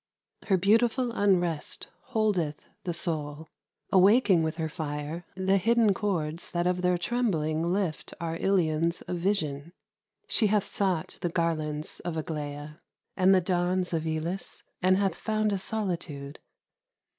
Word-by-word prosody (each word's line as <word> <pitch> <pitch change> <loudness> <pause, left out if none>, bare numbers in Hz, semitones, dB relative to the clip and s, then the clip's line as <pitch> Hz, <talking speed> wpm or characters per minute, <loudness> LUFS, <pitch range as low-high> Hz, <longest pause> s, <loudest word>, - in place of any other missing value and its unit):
Her 190 - +4
beautiful 230 +6 +3
unrest 175 -7 +1 0.2
Holdeth 195 - +1 0.3
the 175 - -1
soul, 155 -2 -2 0.4
awaking 195 -1 +5
with 160 0 -1
her 160 -2 -1
fire 150 +2 -5
The 190 +1 +2
hidden 230 +1 +3
chords 170 -6 -2
that 175 0 -1
of 180 0 +1
their 180 0 +2
trembling 170 -7 0
lift 185 -5 -2
Our 165 -1 -3
Ilions 170 -2 +1
of 180 - -4
vision. 170 -5 -1 0.5
She 215 - +3
hath 205 -1 +2
sought 185 -5 -1
The 175 - 0
garlands 155 -3 -2
of 175 -2 -4
Aglaia, 150 -2 -5 0.3
and 185 0 +4
the 185 - +4
dawns 180 0 0
Of 160 -1 -1
Elis, 160 +4 -3 0.2
and 185 +1 +4
hath 195 -1 +1
found 215 -1 0
a 195 - -1
solitude. 170 -9 -3
175 Hz, 135 wpm, -28 LUFS, 160-195 Hz, 0.5 s, awaking